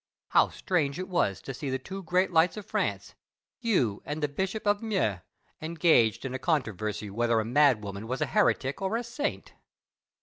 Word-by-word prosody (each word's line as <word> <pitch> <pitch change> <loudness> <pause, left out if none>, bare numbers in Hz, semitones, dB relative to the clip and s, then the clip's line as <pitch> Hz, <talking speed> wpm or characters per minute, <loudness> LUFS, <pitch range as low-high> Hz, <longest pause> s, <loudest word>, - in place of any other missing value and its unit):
How - - +4
strange 150 -7 -1
was 175 - 0
it - - -17
to 135 - -4
see 135 +2 -5
the 130 - 0
two 190 +9 -7
great 185 +1 +1
lights 170 +4 +3
of 210 - -6
France, - - -2 0.5
you 180 - +1
and 150 +2 -4
the - - +3
Bishop 190 +9 -3
of 205 0 +2
Meaux, 190 - 0 0.4
engaged 160 -9 +3
in 130 - -3
a 130 - -3
controversy 110 - -1
whether 115 +2 +1
a 110 - -1
madwoman 110 -6 +2
was 130 +2 -3
a - - +1
heretic 145 -10 +2
or 195 +4 0
a 240 - -3
saint! 240 +5 -4
150 Hz, 180 wpm, -28 LUFS, 115-190 Hz, 0.5 s, How